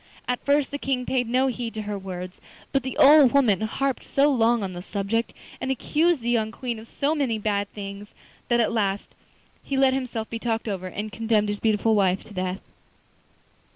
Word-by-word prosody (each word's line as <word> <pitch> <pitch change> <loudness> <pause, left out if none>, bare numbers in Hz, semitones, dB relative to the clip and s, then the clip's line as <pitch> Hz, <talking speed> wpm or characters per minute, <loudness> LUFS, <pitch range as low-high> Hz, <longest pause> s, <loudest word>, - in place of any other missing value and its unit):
At 250 0 -2
first 285 0 +2
the 285 - -4
King 260 -2 -1
paid 250 -3 0
no 255 +2 +3
heed 240 -3 -3
to 215 - -3
her 205 0 -4
words, 185 -2 -7 0.3
but 275 - +2
the 260 +1 -5
old 285 -2 +7
woman 235 -9 +3
harped 265 +5 -1
so 285 +2 +2
long 235 -3 +2
on 190 -1 -4
the 175 - -6
subject, 200 +4 -2 0.3
and 260 - -2
accused 305 +4 +1
the 235 - -2
young 220 -2 +1
Queen 235 -1 -4
of 220 - -12
so 285 +6 0
many 270 -8 0
bad 205 -1 -1
things, 200 0 -8 0.3
that 240 -1 +2
at 230 0 +2
last 200 -3 -1 0.5
he 275 - -2
let 265 -1 +4
himself 245 -4 -3
be 230 - -5
talked 225 -1 -2
over, 190 -3 -3
and 210 +4 -5
condemned 215 0 +1
his 205 0 -3
beautiful 220 0 +2
wife 190 -2 +2
to 210 - -14
death. 185 0 -3
225 Hz, 200 wpm, -25 LUFS, 205-260 Hz, 0.5 s, old